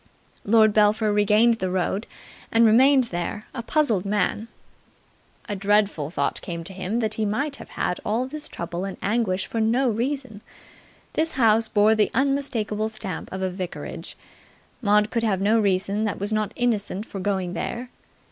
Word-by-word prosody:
Lord 215 0 +4
Belpher 210 0 +3
regained 210 +3 +4
the 185 - -1
road, 190 +3 -1 0.4
and 230 +1 +5
remained 260 +5 +6
there, 175 +5 -3
a 235 - -4
puzzled 235 - +2
man. 205 +2 -1 1.0
A 205 - -3
dreadful 200 -6 +1
thought 140 -4 -1
came 170 -1 -5
to 190 +3 -6
him 195 +5 -2
that 215 -1 0
he 220 - -1
might 275 +8 -1
have - - -11
had 180 - -2
all 230 +4 0
this 300 +3 -6
trouble 170 +1 -5
and 195 -1 -5
anguish 200 -3 0
for 230 - -4
no 240 +3 +2
reason. 250 -1 -3 0.7
This 320 +1 +1
house 225 -3 +3
bore 210 +1 +4
the 215 -1 +2
unmistakable 240 -6 0
stamp 215 -3 -5
of 190 0 -4
a 185 - -1
vicarage. 180 -1 -6 0.6
Maud 210 -1 +3
could 230 - 0
have 210 -5 +1
no 215 +4 +3
reason 200 +1 0
that 205 - -2
was 205 +2 -2
not 215 -1 0
innocent 215 -4 -1
for 200 - -7
going 190 -2 -1
there. 240 +7 -4
215 Hz, 165 wpm, -24 LUFS, 195-230 Hz, 1.0 s, remained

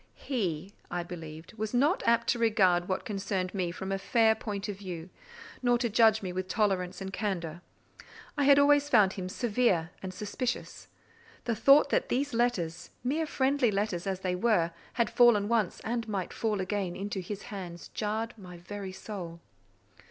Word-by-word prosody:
He, 190 - -3 0.2
I 175 0 -2
believed, 165 0 -9
was 220 +2 -2
not 290 +9 +3
apt 235 0 +4
to 240 - +2
regard 190 -6 +3
what 185 - -1
concerned 195 -4 -2
me 185 -3 -1
from 190 +3 -5
a 195 - -1
fair 220 +3 +4
point 210 -2 -5
of 200 -2 -5
view, 180 -3 -7 0.5
nor 245 -1 +3
to 235 -2 -1
judge 220 -1 +5
me 180 -1 -3
with 185 0 -3
tolerance 190 -4 0
and 190 0 -5
candour: 175 -5 -3 0.7
I 285 -2 +1
had 280 0 +7
always 290 0 +5
found 210 -7 +5
him 185 -2 -5
severe 205 -7 +1
and 190 - -5
suspicious: 210 +6 -4 0.6
the 235 - 0
thought 275 +6 +6
that - - +1
these 280 +2 0
letters, 195 -9 0
mere 305 +5 0
friendly 270 -3 +2
letters 200 -3 -1
as 190 -1 -2
they 185 -1 -1
were, 180 -4 +2 0.2
had 235 -2 +2
fallen 235 -4 +5
once, 220 -5 0
and 230 0 -2
might 195 -4 -3
fall 215 -3 -1
again, 185 -2 -2
into 200 0 -4
his 195 +2 -6
hands, 175 -3 -7
jarred 220 +2 -2
my 180 -2 -10
very 195 +2 -7
soul. 185 -3 -7
205 Hz, 175 wpm, -29 LUFS, 185-235 Hz, 0.7 s, had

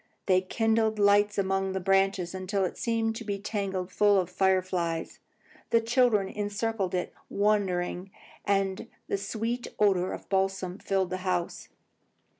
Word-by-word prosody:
They 185 -1 +4
kindled 220 +2 +1
lights 205 0 +4
among 195 -1 0
the 190 - -1
branches 195 -1 +1
until 190 +1 -1
it - - -4
seemed 225 -1 -1
to 230 - -6
be 205 -2 -3
tangled 195 -3 -3
full 205 0 +4
of 180 -1 -2
fire 190 0 +2
flies. 170 -3 -3 0.5
The 230 - +4
children 230 -3 +2
encircled 205 -1 -2
it, 180 - -2 0.2
wondering, 195 -3 0 0.3
and 195 -1 0 0.2
the - - 0
sweet 230 +4 -3
odour 190 -3 +2
of - - -5
the - - -33
balsam 190 -1 -1
filled 190 -2 -1
the 185 - -1
house. 180 -2 -3
195 Hz, 150 wpm, -28 LUFS, 185-210 Hz, 0.5 s, They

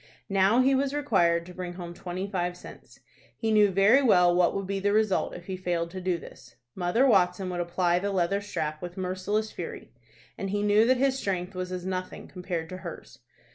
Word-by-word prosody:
Now 195 +5 +4
he 270 +1 +3
was 275 +1 0
required 175 -12 +2
to 180 - -11
bring 180 -1 -6
home 175 -1 -7
twenty 180 +1 -5
five 180 -3 -2
cents. - - -14 0.4
He 225 -1 -1
knew 210 -1 +5
very 200 +8 +5
well 180 -9 +5
what 175 -1 +3
would 195 0 -2
be 195 +1 -2
the 205 +1 +1
result 215 -3 +1
if 175 - -10
he 190 - -4
failed 175 -2 -2
to 185 0 -6
do 180 -1 0
this. 125 -7 -14 0.2
Mother 185 +8 +1
Watson 185 -5 +2
would 175 - -3
apply 175 0 +1
the 200 +2 -2
leather 195 +1 0
strap 155 -6 -4
with 175 +1 -7
merciless 190 +4 -2
fury, 170 - -7 0.5
and 195 - -3
he 205 +1 -1
knew 210 +2 +4
that 255 0 +4
his 270 +1 +1
strength 185 -3 -3
was 185 0 -5
as 180 -1 -5
nothing 185 -1 -5
compared 180 -3 -5
to 185 - -6
hers. - - -10
185 Hz, 210 wpm, -27 LUFS, 175-205 Hz, 0.5 s, knew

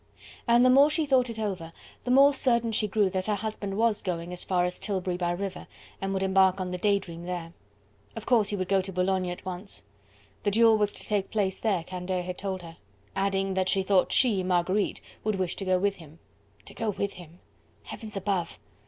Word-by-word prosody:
And 240 +1 +5
the 255 - +6
more 280 +3 +7
she 310 0 0
thought 260 -3 +3
it 230 - -6
over, 190 -7 -3 0.3
the - - -3
more 275 +3 +6
certain 235 -4 +2
she 215 -1 +1
grew 205 0 +2
that 185 +1 -1
her 210 - +1
husband 205 -1 -4
was 225 -2 +2
going 175 -1 -4
as 180 - -3
far 180 -2 +1
as 180 0 -3
Tilbury 190 -3 -2
by 175 -1 -1
river 185 +1 -4 0.3
and 195 0 -2
would 195 0 -1
embark 190 0 +4
on 185 -1 -3
the 180 - -4
"Day 200 +1 +3
Dream" 170 -3 -8
there. 175 -2 -5 0.6
Of - - -7
course 225 -5 +4
he 205 - 0
would 185 -2 -2
go 195 0 +3
to 190 +1 -5
Boulogne 185 0 0
at 175 +1 -7
once. 185 - -5 0.6
The - - +1
duel 225 +2 +5
was 205 -1 +2
to - - -7
take 205 -2 -1
place 195 -3 -1
there, 195 -7 0
Candeille 180 +1 -3
had 180 0 -6
told 190 -2 -4
her 165 -1 -11 0.4
that... - - -2
adding 195 0 -1
that 185 0 0
she 195 0 +1
thought 190 -1 +3
she, 225 -7 +3
Marguerite, 185 +2 0 0.2
would 215 -1 0
wish 185 -2 -2
to 195 - -4
go 185 -1 +3
with 200 +2 0
him. 160 -2 -14 0.5
To - - -11
go 225 - -2
with 200 0 -2
him! 175 -1 -13 0.5
Heavens 215 -3 -7
above! 190 -3 -2
195 Hz, 225 wpm, -27 LUFS, 180-210 Hz, 0.6 s, more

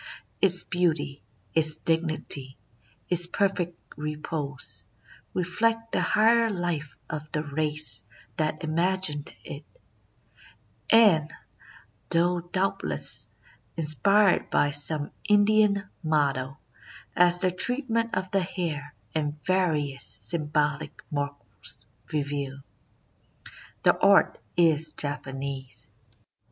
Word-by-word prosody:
Its 180 -2 +6
beauty, 160 -6 -1 0.3
its 155 -1 +1
dignity, 155 -5 0 0.5
its 175 -1 +7
perfect 180 -2 -1 0.2
repose, 145 - -4 0.5
reflect 225 +5 -1
the - - 0
higher 230 +1 +3
life 175 -6 -4
of 150 0 -7
the 150 - -1
race 150 -4 +1 0.3
that 155 0 -2
imagined 165 -2 -1
it; - - -9 1.3
and, 185 -9 +5 0.8
though 175 +1 +1
doubtless 175 - 0 0.5
inspired 175 - +3
by 145 - +1
some 145 +1 +4 0.2
Indian 205 -1 +3
model, 140 -5 -1 0.6
as 175 0 +4
the 185 - +3
treatment 230 +2 0
of 185 0 -3
the 195 - +1
hair 160 -5 -5 0.2
and 150 -1 -3
various 155 -7 0
symbolic 150 +6 -1
marks 140 -8 -5 0.3
reveal, 140 -2 -4 1.2
the - - +5
art - - +4 0.2
is 160 -2 +5
Japanese. 135 -2 -3
155 Hz, 90 wpm, -26 LUFS, 145-185 Hz, 1.3 s, its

